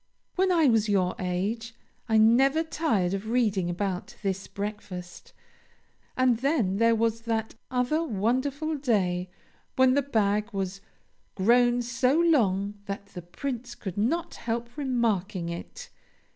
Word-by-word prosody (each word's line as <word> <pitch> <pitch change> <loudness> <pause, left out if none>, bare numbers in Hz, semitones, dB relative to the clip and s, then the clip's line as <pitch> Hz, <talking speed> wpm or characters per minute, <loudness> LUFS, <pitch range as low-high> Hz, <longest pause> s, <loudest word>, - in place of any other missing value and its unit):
When 375 0 +2
I 330 -3 +4
was 225 -4 +3
your 185 -3 +2
age, 205 +6 -2 0.3
I 220 - +4
never 265 +8 +5
tired 225 - 0
of 195 +3 -4
reading 210 -7 +1
about 190 +5 -3
this 195 -1 -2
breakfast; 195 -3 -7 0.9
and 255 -2 +3
then 250 - +1
there 230 +1 +4
was 230 0 0
that 225 -1 -2 0.2
other 250 +5 +1
wonderful 265 +6 -1
day 185 -9 0 0.5
when 260 0 +5
the 285 - +3
bag 210 -5 0
was 195 0 -3 0.5
"grown 240 +4 +3
so 250 +5 +1
long 205 - +2
that 200 0 -6
the 180 - -6
Prince 240 +7 -5
could 190 -5 -6
not 320 +12 0
help 235 +1 -4
remarking 220 - -1
it. 170 0 -8
225 Hz, 130 wpm, -27 LUFS, 195-255 Hz, 0.9 s, never